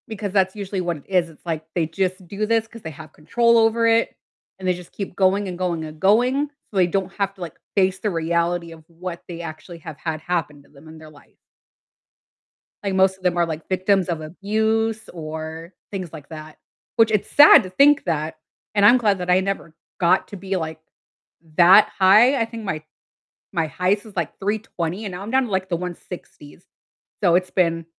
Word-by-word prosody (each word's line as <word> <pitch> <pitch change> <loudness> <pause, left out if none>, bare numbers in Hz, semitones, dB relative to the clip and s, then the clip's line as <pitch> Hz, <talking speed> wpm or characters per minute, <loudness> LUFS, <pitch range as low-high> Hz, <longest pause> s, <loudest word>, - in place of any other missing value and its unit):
Because 210 -3 -5
that's 190 -1 +2
usually 195 -2 -4
what 175 -2 -2
it 140 - -17
is. 180 -3 +1
It's 160 - -19
like 160 -2 -3
they 170 -3 +1
just 185 +3 -3
do 205 +4 -2
this 225 0 +1
'cause 230 0 -13
they 160 - -6
have 155 +1 -12
control 235 +9 +2
over 225 +1 +3
it, 230 0 +2 0.4
and 185 - -4
they 180 - +3
just 180 -1 -11
keep 195 -3 -6
going 195 +1 +2
and 180 -1 -5
going 175 -3 -2
and 155 0 -10
going 245 - +3 0.2
so 205 - -5
they 180 -2 +4
don't 190 +1 -2
have 200 -1 -1
to, 190 - -16
like, 175 - -7 0.2
face 190 -1 +2
the 210 - -1
reality 170 0 -1
of 160 -1 -13
what 175 +1 -8
they 170 -1 -7
actually 165 +1 -9
have 160 -2 -9
had 155 0 -4
happen 155 -4 -3
to - - -25
them 145 +2 -17
in 160 0 -12
their 155 -1 -13
life. 150 -1 -20 1.5
Like, 195 -2 -1
most 190 0 +3
of 190 - -25
them 180 -1 +1
are, 170 - +3
like, 160 -1 -6
victims 185 0 +1
of 165 -2 -2
abuse 220 +6 -1
or 160 +1 -7 0.2
things 185 -5 -5
like 150 -3 -11
that, 155 -1 -10 0.4
which 225 -1 +4
it's 210 -2 0
sad 290 -2 +8
to 185 - -7
think 280 +9 +4
that, 160 -2 -2 0.4
and 205 -1 +4
I'm 240 +5 +8
glad 205 -5 +1
that 180 0 -4
I 180 +1 +5
never 190 -4 -4 0.2
got 175 -2 +3
to 200 - -8
be, 190 +1 -3
like, 160 -3 -4 0.8
that 180 +4 +7
high. 215 +8 +6
I 230 - +2
think 225 0 -8
my 155 -5 -3 0.7
my 165 -4 0
highest 185 +7 0
was, 215 -3 -14
like, 170 -4 -3
320 200 -2 -3
and 195 - -5
now 180 +2 -6
I'm 210 - -6
down 265 +1 +3
to, 240 - -6
like, 190 -1 -1
the 170 - +1
160s. 175 -2 -9 0.6
So, 175 -4 +4
it's 185 +1 +1
been 165 -2 +1
185 Hz, 210 wpm, -22 LUFS, 165-205 Hz, 1.5 s, sad